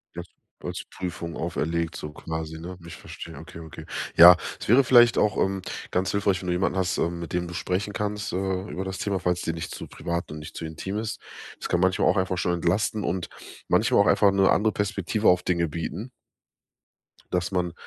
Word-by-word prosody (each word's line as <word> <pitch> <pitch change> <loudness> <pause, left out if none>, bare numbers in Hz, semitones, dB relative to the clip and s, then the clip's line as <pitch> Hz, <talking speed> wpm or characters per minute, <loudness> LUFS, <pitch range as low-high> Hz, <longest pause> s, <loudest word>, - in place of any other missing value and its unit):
Ja, - - -5 0.4
als - - -4
Prüfung 85 -2 -5
auferlegt 85 -1 -2
so 75 - -6
quasi, 80 +1 -5
ne? 90 +2 -7
Ich 85 0 -9
verstehe, 80 -3 -9
okay, 80 +1 -10
okay. 80 -2 -10 0.3
Ja, 85 +1 +11 0.2
es - - -7
wäre 130 +5 +6
vielleicht 120 -2 +6
auch, 105 -2 +2
ähm, 95 0 0 0.3
ganz 90 +1 0
hilfreich, 100 -2 +1
wenn 90 - -7
du 90 - +1
jemanden 95 +1 0
hast, 90 -3 0
ähm, 85 +1 -1
mit 85 - -7
dem 90 0 -1
du 85 - -8
sprechen 95 +4 -2
kannst, 105 -2 -3
äh, 95 0 -1
über 95 - -4
das 95 0 -4
Thema, 100 -2 -1
falls 90 0 0
dir 80 - -2
nicht 80 0 -5
zu - - -8
privat 85 -2 -4
und 75 - -6
nicht 75 - -10
zu 80 - -5
intim 95 +6 -5
ist. 110 0 -3 0.4
Das - - -5
kann 90 - +2
manchmal 95 0 +3
auch - - +2
einfach 95 -1 0
schon 90 - +1
entlasten 95 +5 0
und 90 -2 -2 0.4
manchmal - - +4
auch - - +3
einfach 100 -1 +5
'ne 95 -1 +3
andere 110 0 +3
Perspektive 105 +1 -1
auf 90 0 +3
Dinge 85 -2 +1
bieten 85 - -5 1.2
dass 90 +1 0
man 90 -2 -1
90 Hz, 210 wpm, -26 LUFS, 85-95 Hz, 1.2 s, Ja